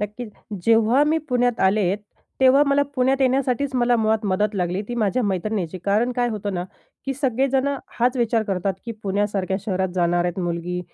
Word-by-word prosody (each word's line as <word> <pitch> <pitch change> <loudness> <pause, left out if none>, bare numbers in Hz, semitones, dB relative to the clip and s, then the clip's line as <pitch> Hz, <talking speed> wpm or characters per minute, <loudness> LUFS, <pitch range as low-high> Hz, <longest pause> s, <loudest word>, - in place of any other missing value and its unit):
नक्कीच. 210 +3 -5 0.4
जेव्हा 230 +4 +4
मी 310 +2 +2
पुण्यात 245 -2 +1
आले 190 -1 +2 0.5
तेव्हा 265 +2 +6
मला 280 0 +3
पुण्यात 265 +1 +1
येण्यासाठीच 265 +1 +1
मला 245 -1 +3
मुळात 220 0 +1
मदत 205 +2 0
लागली 180 +1 -1
ती 240 - -3
माझ्या 235 +2 0
मैत्रिणीची. 190 -2 -2
कारण 220 +5 +1
काय 245 -1 +1
होतं 205 -3 -4
ना, 175 0 -2 0.4
की 270 - 0
सगळेजणं 270 +1 0 0.2
हाच 245 +2 +2
विचार 230 -2 +1
करतात, 195 -2 -2
की 230 - -4
पुण्यासारख्या 195 -1 -1
शहरात 190 -1 -1
जाणार 175 -1 +1
आहेत 175 +1 -2
मुलगी, 175 0 -3
220 Hz, 170 wpm, -22 LUFS, 190-250 Hz, 0.5 s, तेव्हा